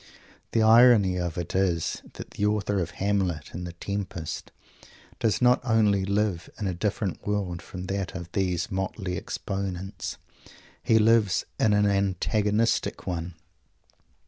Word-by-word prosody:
The 115 Hz, -, +3 dB
irony 110 Hz, -4 st, +6 dB
of 85 Hz, -1 st, -3 dB
it 85 Hz, -1 st, -4 dB
is 90 Hz, -4 st, 0 dB
that -, -, -9 dB
the -, -, -4 dB
author 105 Hz, -1 st, 0 dB
of 85 Hz, -2 st, -2 dB
Hamlet 95 Hz, -5 st, -1 dB
and 90 Hz, +1 st, -5 dB
the 85 Hz, -, -7 dB
Tempest 90 Hz, -3 st, -5 dB, 0.7 s
does 110 Hz, -2 st, +1 dB
not 125 Hz, 0 st, +5 dB
only 105 Hz, -5 st, +3 dB
live 100 Hz, -3 st, 0 dB
in 105 Hz, -, -2 dB
a 95 Hz, -, 0 dB
different 100 Hz, +1 st, -2 dB
world 95 Hz, -5 st, -1 dB
from 90 Hz, +1 st, -8 dB
that 95 Hz, -1 st, -3 dB
of 85 Hz, -2 st, -5 dB
these 90 Hz, -3 st, -1 dB
motley 95 Hz, -1 st, -3 dB
exponents. 95 Hz, -1 st, -4 dB, 0.6 s
He 110 Hz, -, +3 dB
lives 110 Hz, -4 st, +3 dB
in 110 Hz, -, +3 dB
an 105 Hz, 0 st, +4 dB
antagonistic 105 Hz, +2 st, +1 dB
one. 85 Hz, -1 st, -4 dB
95 Hz, 140 wpm, -26 LUFS, 90-105 Hz, 0.7 s, irony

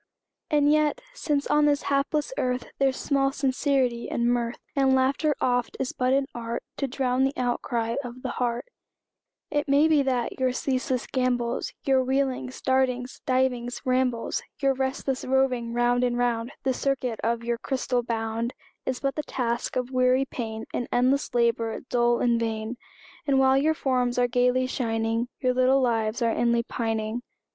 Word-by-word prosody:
And 295 Hz, -1 st, +4 dB
yet, 305 Hz, +8 st, +2 dB
since 295 Hz, -11 st, -1 dB
on 295 Hz, 0 st, +3 dB
this 290 Hz, -1 st, +2 dB
hapless 290 Hz, -, 0 dB
earth 250 Hz, -, -2 dB
There's 270 Hz, -1 st, +2 dB
small 275 Hz, -1 st, +1 dB
sincerity 265 Hz, -3 st, 0 dB
in 235 Hz, -, 0 dB
mirth, 240 Hz, -1 st, 0 dB, 0.2 s
And 270 Hz, -1 st, +4 dB
laughter 275 Hz, +3 st, +2 dB
oft 245 Hz, -1 st, 0 dB
is 260 Hz, -, -1 dB
but 255 Hz, -1 st, 0 dB
an 275 Hz, +1 st, +3 dB
art 235 Hz, 0 st, -4 dB
To 275 Hz, -, -1 dB
drown 260 Hz, 0 st, 0 dB
the 270 Hz, +1 st, +1 dB
outcry 235 Hz, -2 st, -1 dB
of 245 Hz, 0 st, -9 dB
the -, -, -2 dB
heart; 240 Hz, -1 st, -1 dB, 0.9 s
It 295 Hz, 0 st, 0 dB
may 285 Hz, +3 st, +5 dB
be 310 Hz, -3 st, +4 dB
that 255 Hz, -3 st, -1 dB
your 255 Hz, -1 st, +2 dB
ceaseless 255 Hz, -2 st, -1 dB
gambols, 245 Hz, -2 st, -1 dB
Your 265 Hz, -1 st, +3 dB
wheelings, 260 Hz, -1 st, -1 dB
dartings, 260 Hz, -1 st, 0 dB
divings, 250 Hz, -2 st, 0 dB
rambles, 255 Hz, -2 st, 0 dB, 0.2 s
Your 275 Hz, -1 st, +2 dB
restless 265 Hz, 0 st, -2 dB
roving 255 Hz, -3 st, +1 dB
round 240 Hz, +1 st, +2 dB
and 245 Hz, -1 st, +1 dB
round, 240 Hz, 0 st, 0 dB
The 260 Hz, 0 st, +1 dB
circuit 255 Hz, -3 st, -1 dB
of 230 Hz, 0 st, 0 dB
your 235 Hz, 0 st, -1 dB
crystal 255 Hz, -2 st, -1 dB
bound 230 Hz, 0 st, -2 dB, 0.3 s
Is 260 Hz, -1 st, -2 dB
but 275 Hz, -1 st, 0 dB
the 300 Hz, -, -2 dB
task 240 Hz, -5 st, -2 dB
of 250 Hz, 0 st, -2 dB
weary 255 Hz, +1 st, +3 dB
pain, 225 Hz, -4 st, -5 dB
An 245 Hz, -, -2 dB
endless 255 Hz, +1 st, +1 dB
labor, 230 Hz, -1 st, +1 dB
dull 240 Hz, -1 st, +2 dB
and 235 Hz, -1 st, +3 dB
vain; 225 Hz, 0 st, -2 dB, 0.5 s
And 275 Hz, -1 st, +3 dB
while 265 Hz, 0 st, +5 dB
your 305 Hz, +4 st, +3 dB
forms 250 Hz, -4 st, 0 dB
are 245 Hz, 0 st, +3 dB
gaily 250 Hz, +1 st, +2 dB
shining, 225 Hz, -2 st, -1 dB
Your 255 Hz, -1 st, +2 dB
little 255 Hz, +2 st, +4 dB
lives 230 Hz, -2 st, 0 dB
are 230 Hz, -, +3 dB
inly 235 Hz, 0 st, +2 dB
pining! 225 Hz, 0 st, -2 dB
255 Hz, 165 wpm, -26 LUFS, 240-270 Hz, 0.9 s, may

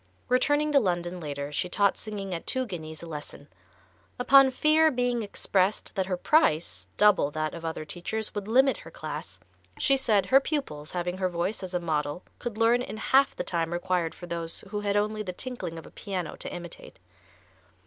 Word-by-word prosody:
Returning 290 Hz, +4 st, +3 dB
to 285 Hz, -, +6 dB
London 175 Hz, -4 st, -1 dB
later 145 Hz, -2 st, -5 dB
she 175 Hz, +4 st, -1 dB
taught 200 Hz, +2 st, +3 dB
singing 200 Hz, -3 st, -5 dB
at 165 Hz, -, -5 dB
two 260 Hz, -1 st, 0 dB
guineas 160 Hz, -6 st, -7 dB
a -, -, -6 dB
lesson. 150 Hz, -2 st, -8 dB, 0.7 s
Upon 270 Hz, +2 st, +7 dB
fear 310 Hz, +4 st, +4 dB
being 245 Hz, -3 st, 0 dB
expressed 200 Hz, -1 st, 0 dB
that 190 Hz, -3 st, -1 dB
her 185 Hz, -2 st, -1 dB
price, 155 Hz, -, +2 dB
double 210 Hz, -8 st, +5 dB
that 155 Hz, 0 st, -2 dB
of 170 Hz, -, -8 dB
other 160 Hz, -1 st, -4 dB
teachers, 215 Hz, +7 st, -4 dB
would 205 Hz, -1 st, -4 dB
limit 265 Hz, +4 st, +4 dB
her -, -, -11 dB
class, -, -, -7 dB, 0.4 s
she 275 Hz, -, +3 dB
said 215 Hz, -7 st, +2 dB
her 265 Hz, +8 st, +6 dB
pupils 215 Hz, -, -3 dB
having 180 Hz, +1 st, -2 dB
her 185 Hz, -1 st, +1 dB
voice 175 Hz, +5 st, -2 dB
as 185 Hz, -1 st, -5 dB
a -, -, +2 dB
model 155 Hz, 0 st, -2 dB, 0.2 s
could 235 Hz, -3 st, -5 dB
learn 230 Hz, +2 st, +4 dB
in 235 Hz, -, -5 dB
half 270 Hz, +4 st, +3 dB
the -, -, -3 dB
time 165 Hz, -1 st, -1 dB
required 175 Hz, -1 st, -1 dB
for 175 Hz, -, -9 dB
those 170 Hz, -1 st, -2 dB
who 210 Hz, -, -1 dB
had 205 Hz, 0 st, +1 dB
only 215 Hz, +1 st, 0 dB
the 190 Hz, -4 st, -4 dB
tinkling 240 Hz, -7 st, -5 dB
of 160 Hz, -, -9 dB
a -, -, -13 dB
piano 185 Hz, -5 st, -4 dB
to -, -, -3 dB
imitate. 175 Hz, -1 st, -9 dB
190 Hz, 190 wpm, -28 LUFS, 170-240 Hz, 0.7 s, Upon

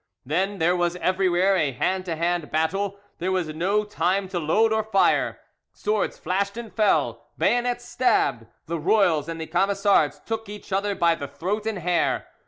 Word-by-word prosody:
Then 190 Hz, +8 st, -1 dB
there 175 Hz, +1 st, +2 dB
was 175 Hz, 0 st, 0 dB
everywhere 185 Hz, +1 st, +2 dB
a 150 Hz, -7 st, +1 dB
hand 185 Hz, +8 st, -1 dB
to 170 Hz, -3 st, -2 dB
hand 170 Hz, -1 st, -1 dB
battle 195 Hz, +6 st, -1 dB, 0.2 s
there 185 Hz, +2 st, -1 dB
was 180 Hz, -4 st, 0 dB
no 185 Hz, +7 st, 0 dB
time 200 Hz, -2 st, 0 dB
to 180 Hz, -2 st, -2 dB
load 215 Hz, +8 st, +2 dB
and 220 Hz, 0 st, 0 dB
fire; 195 Hz, -3 st, +2 dB, 0.3 s
swords 210 Hz, -1 st, -1 dB
flashed 200 Hz, +3 st, -2 dB
and 235 Hz, -2 st, -7 dB
fell, 215 Hz, -2 st, +1 dB
bayonets 245 Hz, 0 st, +1 dB
stabbed, 145 Hz, -, +1 dB, 0.2 s
the 170 Hz, +1 st, -3 dB
royals 165 Hz, -3 st, +2 dB
and 165 Hz, 0 st, -5 dB
the 160 Hz, -, -4 dB
Camisards 195 Hz, -4 st, +2 dB
took 225 Hz, -2 st, -4 dB
each 205 Hz, -1 st, -8 dB
other 200 Hz, +1 st, 0 dB
by 170 Hz, -2 st, +3 dB
the 150 Hz, -4 st, -5 dB
throat 185 Hz, +10 st, -3 dB
and 220 Hz, -3 st, -2 dB
hair. 175 Hz, -1 st, 0 dB
190 Hz, 175 wpm, -24 LUFS, 165-205 Hz, 0.3 s, by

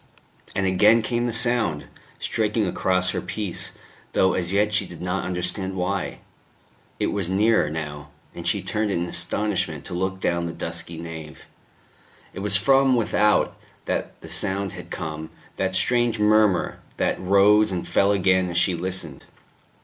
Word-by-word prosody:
And 100 Hz, -, 0 dB
again 105 Hz, +5 st, +4 dB
came 120 Hz, +1 st, -1 dB
the -, -, -1 dB
sound, 115 Hz, -9 st, +1 dB, 0.3 s
striking 110 Hz, 0 st, 0 dB
across 90 Hz, 0 st, +1 dB
her -, -, -3 dB
peace, 95 Hz, 0 st, -1 dB, 0.4 s
though 95 Hz, 0 st, +3 dB
as 90 Hz, -1 st, -2 dB
yet 105 Hz, +2 st, +2 dB
she 100 Hz, -2 st, +1 dB
did 85 Hz, -, -11 dB
not 90 Hz, +2 st, -2 dB
understand 90 Hz, +2 st, 0 dB
why. 95 Hz, +1 st, -2 dB, 0.8 s
It -, -, 0 dB
was 100 Hz, -4 st, -2 dB
nearer 105 Hz, -4 st, +3 dB
now; 75 Hz, -2 st, -6 dB, 0.2 s
and -, -, -6 dB
she -, -, +1 dB
turned 110 Hz, 0 st, -1 dB
in 85 Hz, -3 st, -1 dB
astonishment 90 Hz, -6 st, -1 dB
to -, -, -7 dB
look 95 Hz, +2 st, -2 dB
down 85 Hz, -2 st, 0 dB
the 85 Hz, -, -5 dB
dusky 85 Hz, 0 st, -4 dB
nave. 80 Hz, -2 st, -9 dB, 0.9 s
It -, -, -7 dB
was 100 Hz, 0 st, +4 dB
from 135 Hz, +4 st, +4 dB
without 105 Hz, -2 st, +2 dB, 0.3 s
that -, -, -3 dB
the -, -, -11 dB
sound 100 Hz, -1 st, 0 dB
had -, -, -10 dB
come, 80 Hz, 0 st, -5 dB, 0.3 s
that 95 Hz, -1 st, -1 dB
strange 120 Hz, +2 st, +2 dB
murmur, 105 Hz, -2 st, +2 dB, 0.2 s
that -, -, 0 dB
rose 100 Hz, +3 st, +4 dB
and 90 Hz, -2 st, -3 dB
fell 100 Hz, +1 st, +3 dB
again 95 Hz, -2 st, +2 dB
as 85 Hz, -, -3 dB
she 90 Hz, +1 st, +3 dB
listened. 85 Hz, -4 st, -4 dB
95 Hz, 155 wpm, -23 LUFS, 85-105 Hz, 0.9 s, again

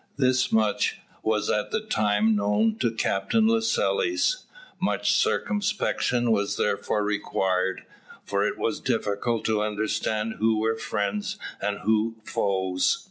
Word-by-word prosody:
Thus 130 Hz, -2 st, +2 dB
much 110 Hz, -2 st, +2 dB, 0.2 s
was 110 Hz, -1 st, 0 dB
at 105 Hz, -, 0 dB
the -, -, 0 dB
time 110 Hz, -, +1 dB
known 105 Hz, +2 st, +2 dB
to 120 Hz, -, +2 dB
Captain 115 Hz, -, +1 dB
Lascelles. 325 Hz, -, +1 dB, 0.3 s
Much -, -, +1 dB
circumspection 205 Hz, -, +1 dB
was 100 Hz, -2 st, +1 dB
therefore 105 Hz, +1 st, 0 dB
required, 95 Hz, -2 st, -1 dB, 0.4 s
for -, -, 0 dB
it -, -, -1 dB
was -, -, -1 dB
difficult 110 Hz, +3 st, -1 dB
to 110 Hz, -1 st, +1 dB
understand 110 Hz, +1 st, -1 dB
who 110 Hz, 0 st, +3 dB
were 110 Hz, +1 st, +1 dB
friends 105 Hz, -2 st, -2 dB, 0.2 s
and 100 Hz, 0 st, -2 dB
who 110 Hz, +1 st, +1 dB
foes. 95 Hz, -3 st, 0 dB
110 Hz, 125 wpm, -26 LUFS, 105-120 Hz, 0.4 s, who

